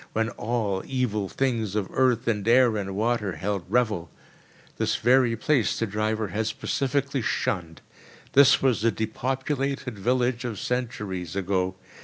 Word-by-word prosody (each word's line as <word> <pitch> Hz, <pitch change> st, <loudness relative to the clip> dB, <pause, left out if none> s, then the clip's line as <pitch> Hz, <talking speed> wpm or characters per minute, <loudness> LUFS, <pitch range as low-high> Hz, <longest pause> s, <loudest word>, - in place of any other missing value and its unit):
When 110 Hz, +1 st, 0 dB
all 105 Hz, -5 st, -2 dB
evil 110 Hz, -7 st, -1 dB
things 115 Hz, -7 st, -1 dB
of 105 Hz, -3 st, 0 dB
earth 125 Hz, -3 st, +2 dB
and 105 Hz, -2 st, 0 dB
air 120 Hz, -1 st, +5 dB
and 95 Hz, -2 st, -3 dB
water 110 Hz, -2 st, 0 dB
held 100 Hz, -1 st, -3 dB
revel. 105 Hz, -9 st, +1 dB, 0.7 s
This -, -, +1 dB
very 120 Hz, 0 st, +3 dB
place 135 Hz, -2 st, +1 dB
the 115 Hz, -, 0 dB
driver 110 Hz, 0 st, -1 dB
had 110 Hz, +2 st, -1 dB
specially 135 Hz, +4 st, -1 dB
shunned. 85 Hz, -6 st, -2 dB, 0.5 s
This 140 Hz, -1 st, +6 dB
was 125 Hz, -6 st, +2 dB
the 115 Hz, -, +3 dB
depopulated 130 Hz, +2 st, -2 dB
village 125 Hz, +2 st, +1 dB
of 115 Hz, -4 st, -4 dB
centuries 105 Hz, -8 st, -3 dB
ago. 95 Hz, -1 st, 0 dB
115 Hz, 140 wpm, -26 LUFS, 100-125 Hz, 0.7 s, This